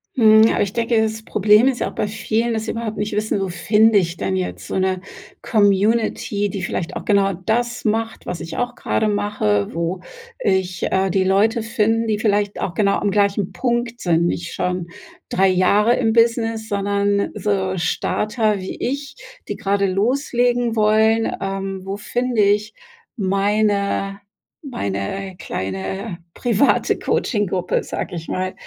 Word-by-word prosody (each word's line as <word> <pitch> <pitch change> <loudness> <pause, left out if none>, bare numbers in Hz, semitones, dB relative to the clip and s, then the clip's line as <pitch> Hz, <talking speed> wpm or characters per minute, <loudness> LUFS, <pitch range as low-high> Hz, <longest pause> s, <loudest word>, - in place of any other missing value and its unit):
Mhm. 220 -2 +6
Aber - - 0
ich 200 -1 -1
denke, 230 -1 +1
das 220 0 -1
Problem 210 +5 +4
ist 260 -2 0
ja - - -1
auch - - -14
bei - - -1
vielen, 220 +3 -1
dass 220 -1 -2
sie - - -2
überhaupt 225 -2 -4
nicht 210 +1 -2
wissen, 210 0 0
wo 195 -1 -2
finde 210 +5 +4
ich 170 -1 -3
denn 95 -1 -1
jetzt 90 -1 -4
so - - -2
'ne 185 -1 0 0.4
Community, 205 0 +1
die 190 -1 -5
vielleicht 175 -1 -3
auch - - -6
genau 200 -1 +3
das 235 +7 -2
macht, 225 +1 -1
was 180 - -4
ich 165 - -7
auch 245 0 -1
gerade 220 - 0
mache, 205 - 0
wo 170 +2 -2 0.4
ich, 190 - 0
äh, 190 -1 +1
die 190 -1 +2
Leute 210 +4 +2
finden, 225 +1 0
die 215 -1 +1
vielleicht 205 -2 0
auch 175 - -2
genau 200 -2 +2
am 205 - 0
gleichen 200 -1 +1
Punkt 240 +4 -2
sind, 170 -1 +2
nicht 170 0 -2
schon 180 -1 -2 0.4
3 190 0 +3
Jahre 205 +5 +3
im 225 -3 +1
Business, 230 -1 +2
sondern 200 0 0
so 190 -2 -1
Starter 210 +5 0
wie 185 - -6
ich, 280 +2 -3 0.3
die - - -2
grade 200 0 0
loslegen 240 +3 +1
wollen. 220 +1 +3
Ähm, 195 0 -3
wo 195 +1 -4
finde 245 +2 -1
ich 210 +1 +2 0.4
meine 200 0 0 0.5
meine 185 - -4
kleine 95 - -4 0.2
private 240 +3 +2
Coaching-Gruppe, 190 -6 0
sage - - -5
ich 165 -1 -6
mal, 185 0 -2
205 Hz, 160 wpm, -20 LUFS, 190-225 Hz, 0.5 s, Mhm